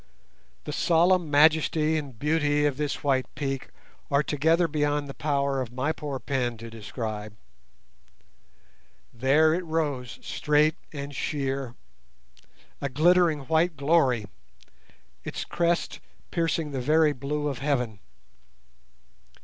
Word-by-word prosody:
The - - -5
solemn 175 +1 +3
majesty 155 +1 +4
and 140 -6 -4
beauty 150 +1 +1
of 145 -2 +1
this 150 -1 -3
white 135 -2 +1
peak 135 -2 -3 0.4
are 140 +1 +3
together 160 +4 +2
beyond 145 -1 0
the 135 - -7
power 140 -2 0
of 120 -3 -5
my 130 +5 -1
poor 145 -4 -5
pen 125 -3 -2
to 115 +1 -9
describe. 110 -1 -6 1.8
There 140 +6 +4
it 180 +2 -1
rose 145 -7 -2
straight 150 +1 +2 0.2
and 140 -1 -6
sheer—a 135 -3 -3 1.1
glittering 165 +2 +3
white 160 +3 +1
glory, 140 -6 +2 1.0
its - - -5
crest 170 0 0 0.3
piercing 165 -2 -1
the 135 -2 -3
very 155 +3 +3
blue 145 +2 -3
of 135 -4 -3
heaven. 125 -7 -1
145 Hz, 115 wpm, -26 LUFS, 135-160 Hz, 1.8 s, majesty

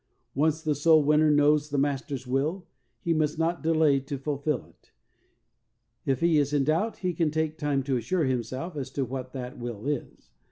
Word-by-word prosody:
Once 155 +3 +1
the 155 -2 +1
soul 155 +2 +4
winner 150 +1 +4
knows 150 0 +3
the 145 - -2
Master's 135 -1 -1
will, 150 +8 -1 0.4
he 170 - +1
must 155 -1 0
not 165 +1 0
delay 155 -3 +3
to 140 +1 -5
fulfill 140 0 -2
it. - - -26 1.2
If 135 -2 +1
he 165 -2 +4
is 145 0 0
in 145 -2 +3
doubt 165 +10 0
he 180 - +1
can 160 -1 +1
take 155 0 -1
time 145 -3 0
to 135 -1 0
assure 155 +8 0
himself 130 +6 -3
as 135 -3 -4
to 135 - -1
what 130 +1 -6
that 125 0 -6
will 120 -2 -6
is. 145 -3 -4
145 Hz, 190 wpm, -27 LUFS, 135-155 Hz, 1.2 s, soul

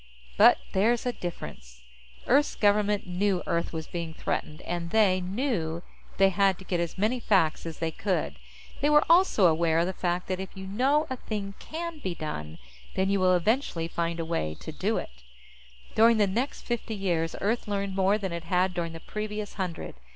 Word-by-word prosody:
But - - +7
there's 225 +6 +2
a 245 - 0
difference. 65 - -8 0.4
Earth's 285 +4 +3
government 205 0 +2
knew 185 +1 0
Earth 170 0 -1
was 160 -1 -4
being 165 -1 -5
threatened, 155 +1 -3
and 170 -1 -3
they 190 -2 +3
knew 180 - -2 0.3
they 195 0 +6
had 195 0 +2
to - - -11
get 175 -1 -1
as 170 +1 -3
many 220 +6 +1
facts 175 -8 +2
as 160 - -6
they 165 -1 -2
could. 160 - -2 0.4
They 290 - +2
were 300 0 +5
also 340 - +5
aware 165 -1 +3
of 170 - +3
the 185 - -2
fact 180 0 -1
that 185 -1 -1
if 190 -1 -5
you 190 - -6
know 265 +10 +2
a 260 - -2
thing 205 -4 -4
can 335 0 -6
be 185 -10 -3
done, 80 - -5 0.4
then 190 +1 +1
you 200 - +2
will 185 -1 +4
eventually 180 -3 0
find 170 0 -2
a 165 - -2
way 120 - -2
to - - -6
do - - -1
it. 60 0 -7 0.7
During 230 +1 +5
the 210 - +4
next 235 +9 -2
fifty 235 -2 -3
years, 170 -5 -1
Earth 225 +3 -1
learned 200 -1 -2
more 195 +2 +3
than 195 -4 -4
it 170 -1 -5
had 180 +2 +1
during 170 -2 -3
the 165 - -7
previous 210 +2 -5
hundred. 185 -4 -4
190 Hz, 195 wpm, -28 LUFS, 170-210 Hz, 0.7 s, But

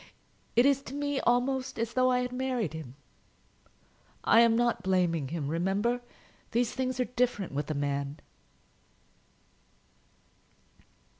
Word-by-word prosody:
It 240 +2 +5
is 275 -1 +4
to 270 - -7
me 285 -1 -1
almost 255 +2 +1
as 230 0 -2
though 255 0 +3
I 250 0 +2
had 250 0 -3
married 250 - -2
him. 150 -6 -8 1.3
I 225 - +6
am 230 -1 +5
not 240 -4 +1
blaming 180 -6 +1
him, 155 -1 -3
remember. 195 +10 0 0.5
These 240 0 +1
things 255 -1 -2
are 250 - +2
different 245 -6 -1
with 145 +2 -3
a 155 - -1
man." 140 0 -2
235 Hz, 130 wpm, -29 LUFS, 165-255 Hz, 1.3 s, I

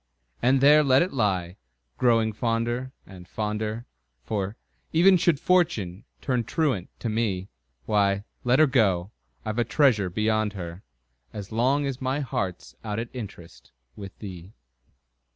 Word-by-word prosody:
And 130 +2 +3
there 150 +2 +7
let 135 0 +5
it 185 - -5
lie, 95 -7 0 0.4
growing 115 -3 +3
fonder 120 +3 -1
and, 90 -2 -13
fonder 110 +3 -3 0.4
For, 100 - -3 0.3
even 185 +4 +6
should 170 -4 +2
Fortune 135 - +1 0.2
turn 125 -3 0
truant 125 - -1
to - - -2
me, 105 -4 -1 0.4
Why, 100 +1 +2 0.2
let 125 +1 +3
her 155 - +7
go 105 -9 +2 0.3
I've 110 +2 -2
a - - +4
treasure 115 - +3
beyond 110 +2 0
her, 90 -2 -7 0.5
As 100 0 -7
long 130 +6 +2
as 135 -1 -4
my 130 +2 -1
heart's 95 - -4
out 105 -1 -3
at 115 +1 -3
interest 100 -9 -10 0.2
With 100 -2 -9
thee! 95 -1 -9
110 Hz, 140 wpm, -26 LUFS, 100-130 Hz, 0.5 s, there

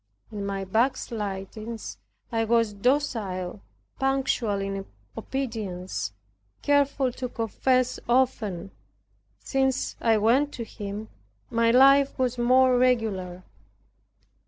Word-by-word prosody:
In 200 -2 -4
my 195 -1 -3
backslidings 220 -1 -2 0.3
I 225 -1 +1
was 230 -1 +2
docile, 205 -6 -1 0.4
punctual 265 -6 +1
in 195 0 -3 0.3
obedience, 215 - -4 0.5
careful 280 -2 +2
to 250 0 -5
confess 255 +3 0
often. 215 -7 +1 0.7
Since 265 -1 0
I 225 -2 +4
went 255 +7 +3
to 235 - -5
him 210 -1 -7 0.4
my 230 0 +3
life 275 +3 +6
was 250 -1 0
more 255 +1 +4
regular. 205 -8 0
230 Hz, 95 wpm, -26 LUFS, 200-260 Hz, 0.7 s, life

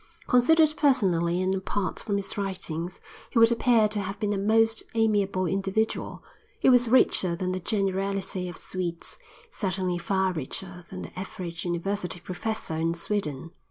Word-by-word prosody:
Considered 310 +5 +4
personally 180 - +2
and 190 +1 +1
apart 190 0 -2
from 205 - -2
his 200 - -3
writings 185 -4 -4 0.3
he - - -3
would 230 0 +7
appear 235 -2 +4
to 210 0 -1
have 195 0 -4
been 210 -1 0
a - - -1
most 225 +2 +3
amiable 205 -4 +2
individual. 195 +4 -1 0.4
He - - +4
was 245 -2 +4
richer 190 -8 +4
than 185 +1 -2
the 185 - -2
generality 195 -1 -1
of 175 - -9
Swedes, 175 -2 -5 0.3
certainly 185 -3 -2
far 190 +1 0
richer 180 +4 -6
than 185 -1 -7
the - - -9
average 175 -3 -6
university 180 +1 -2
professor 185 +2 -4
in 165 +1 0
Sweden. 165 -5 -2
190 Hz, 155 wpm, -27 LUFS, 180-215 Hz, 0.4 s, would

